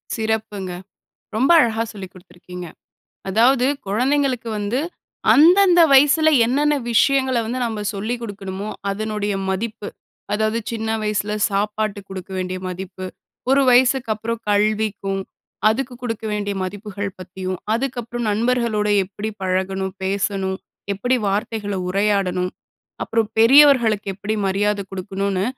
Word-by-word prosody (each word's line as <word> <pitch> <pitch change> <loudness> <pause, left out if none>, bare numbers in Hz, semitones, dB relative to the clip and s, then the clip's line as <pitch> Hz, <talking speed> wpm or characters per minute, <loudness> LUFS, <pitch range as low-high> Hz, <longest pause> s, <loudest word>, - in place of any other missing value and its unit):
சிறப்புங்க, 220 -4 -2 0.6
ரொம்ப 255 +7 +2
அழகா 225 -4 +2
சொல்லி 195 -3 -7
குடுத்திருக்கீங்க. 180 0 -11 0.6
அதாவது 245 +6 +4 0.2
குழந்தைகளுக்கு 255 +2 0
வந்து 205 +4 -1 0.6
அந்தந்த 355 +3 +6
வயசுல 295 +3 +6 0.2
என்னென்ன 295 +4 +2 0.2
விஷயங்கள 265 +2 +3
வந்து 245 +3 -3
நம்ம 220 -2 -4
சொல்லி 215 +4 -2
குடுக்கணுமோ 200 -2 -6 0.2
அதனுடைய 210 0 -2
மதிப்பு, 210 +2 -3 0.4
அதாவது 215 +2 +1
சின்ன 225 -1 -3
வயசுல 210 0 -1 0.2
சாப்பாட்டுக்கு 205 0 -2
குடுக்க 190 -1 -7
வேண்டிய 185 0 -3
மதிப்பு, 185 +1 -6 0.4
ஒரு 275 +1 +5
வயசுக்கு 250 -1 +3
அப்புறம் 225 +2 -4
கல்விக்கும், 205 -2 0 0.5
அதுக்கு 245 +3 -1
குடுக்க 225 -2 -4
வேண்டிய 205 -1 -2
மதிப்புகள் 205 +1 -5
பத்தியும், 185 0 -5 0.2
அதுக்கு 260 +1 -2
அப்புறம் 235 0 -4
நண்பர்களோட 230 -1 +1 0.2
எப்டி 205 +3 -5
பழகணும், 190 +1 -1
பேசணும் 190 0 -1 0.4
எப்டி 245 +6 +1
வார்த்தைகள 205 0 -2
உரையாடணும், 190 -2 +1 0.5
அப்புறம் 225 -2 0
பெரியவர்களுக்கு 235 -4 +6
எப்புடி 210 +3 -3
மரியாத 205 +2 +1
குடுக்கணுனு, 195 0 -2
210 Hz, 115 wpm, -21 LUFS, 195-235 Hz, 0.6 s, அந்தந்த